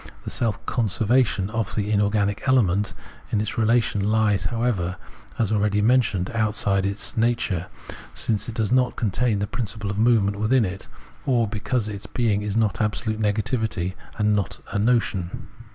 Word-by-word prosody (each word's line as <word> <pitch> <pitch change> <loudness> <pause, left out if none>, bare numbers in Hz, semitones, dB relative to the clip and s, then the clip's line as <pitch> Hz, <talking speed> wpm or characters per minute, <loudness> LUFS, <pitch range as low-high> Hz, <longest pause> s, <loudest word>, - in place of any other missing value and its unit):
The - - -5
self 110 -4 -1
conservation 110 -2 +1
of 115 -3 -2
the 105 0 -1
inorganic 105 +1 +1
element 105 -6 +2 0.4
in 105 - +1
its 110 +1 -2
relation 110 -3 +2
lies 110 -2 +2
however, 115 -7 -1 0.4
as 110 -3 0
already 105 -1 +2
men 125 +5 +5
tioned, 95 -2 -3
outside 105 -3 +2
its 100 +1 -1
nature, 110 -6 0 0.4
since 110 0 -1
it 115 - -6
does 110 -3 0
not 125 -1 +2
contain 110 +1 0
the 100 - -1
principle 110 -2 -4
of 100 - -3
movement 110 -3 +3
within 115 +2 +3
it, 95 +1 -6 0.4
or 120 -4 +3
because 110 +2 -2
its 100 -2 -6
being 110 -4 0
is 105 0 -2
not 110 -2 +1
absolute 110 +1 -1
negativity 105 -3 -1 0.2
and 105 -1 +2
not 100 -3 -2
a 100 - -1
notion. 105 -6 0
105 Hz, 160 wpm, -24 LUFS, 100-115 Hz, 0.4 s, men